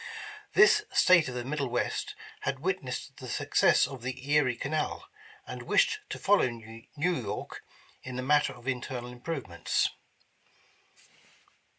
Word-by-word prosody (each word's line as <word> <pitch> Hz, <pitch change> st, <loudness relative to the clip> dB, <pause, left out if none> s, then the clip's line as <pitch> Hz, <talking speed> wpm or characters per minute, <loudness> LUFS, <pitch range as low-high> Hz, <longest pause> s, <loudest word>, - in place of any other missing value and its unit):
This 395 Hz, +2 st, +7 dB
State 180 Hz, -5 st, +5 dB
of 125 Hz, -, -5 dB
the 120 Hz, -1 st, -4 dB
middle 140 Hz, 0 st, -2 dB
west, 120 Hz, 0 st, -2 dB, 0.2 s
had 135 Hz, -1 st, -3 dB
witnessed 140 Hz, -7 st, -3 dB
the 130 Hz, -, -9 dB
success -, -, +3 dB
of 135 Hz, -3 st, -8 dB
the 130 Hz, +3 st, -5 dB
Erie 140 Hz, -5 st, +4 dB
Canal, 155 Hz, -, -2 dB, 0.4 s
and -, -, -7 dB
wished 440 Hz, -3 st, +2 dB
to -, -, -4 dB
follow 200 Hz, -10 st, +3 dB
New 115 Hz, -1 st, -11 dB
York 145 Hz, -, -2 dB, 0.4 s
in 130 Hz, -1 st, -7 dB
the 125 Hz, -, -3 dB
matter 145 Hz, +2 st, +3 dB
of 120 Hz, +1 st, -14 dB
internal 125 Hz, -1 st, -3 dB
improvements. 125 Hz, -, -1 dB
130 Hz, 130 wpm, -29 LUFS, 125-150 Hz, 0.4 s, This